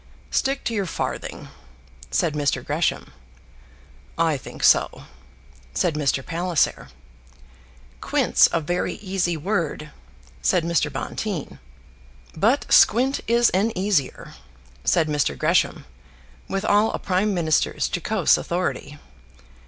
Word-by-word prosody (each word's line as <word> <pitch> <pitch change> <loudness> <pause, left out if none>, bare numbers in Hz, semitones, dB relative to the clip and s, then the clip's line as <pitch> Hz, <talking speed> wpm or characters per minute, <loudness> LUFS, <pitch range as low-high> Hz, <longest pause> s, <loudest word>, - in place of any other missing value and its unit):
"Stick 270 +1 0
to 235 - -2
your 200 -4 -1
farthing," - - -5 0.6
said 155 - 0
Mr. 140 -4 -1
Gresham. 150 +3 -1 1.0
"I - - +2
think - - -9
so," - - +3 0.7
said 170 - +1
Mr. 140 -2 -1
Palliser. 175 -1 -1 1.1
"Quint's - - +3
a 170 - 0
very 175 +3 -2
easy 185 -4 -2
word," 160 -3 -3 0.5
said 180 -3 +2
Mr. 165 -3 0
Bonteen. 165 +5 -5 0.8
"But 225 - +2
squint 260 +5 +5
is 235 +1 +4
an 200 +5 +1
easier," 185 -8 -1 0.5
said 160 - +2
Mr. 145 - 0
Gresham, - - +1 0.6
with 195 +1 -3
all 210 +2 +3
a - - -1
prime 195 +2 0
minister's 160 -3 +1
jocose - - +2
authority. - - -3
175 Hz, 110 wpm, -23 LUFS, 150-205 Hz, 1.1 s, squint